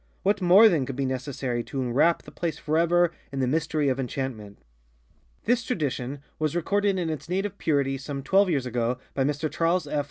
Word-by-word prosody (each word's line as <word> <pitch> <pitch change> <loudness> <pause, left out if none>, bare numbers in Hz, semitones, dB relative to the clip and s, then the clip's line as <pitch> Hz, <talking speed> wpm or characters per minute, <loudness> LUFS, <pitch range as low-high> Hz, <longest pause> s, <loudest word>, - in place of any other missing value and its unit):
What 200 +1 +2
more, 185 +5 +8
then, 155 - +1
could 135 - -4
be 135 0 -1
necessary 130 -2 -3
to 135 - -5
enwrap 130 +7 +2
the - - -12
place 165 -3 -3
forever 170 +3 +2
after - - -27 0.2
in 135 - -4
the 130 - +2
mystery 150 +2 0
of 135 0 0
enchantment? 125 -6 -4 0.9
This 235 0 +1
tradition 140 - -3 0.2
was 155 0 -1
recorded 200 +3 +1
in 170 -3 -1
its 155 0 -6
native 195 +2 -2
purity 140 -3 0
some 135 0 -5
twelve 195 +6 +3
years 140 -6 0
ago 120 0 -1 0.2
by 135 - 0
Mr 145 +3 -1
Charles 170 +2 0
F. 145 0 -1
150 Hz, 195 wpm, -26 LUFS, 135-175 Hz, 0.9 s, more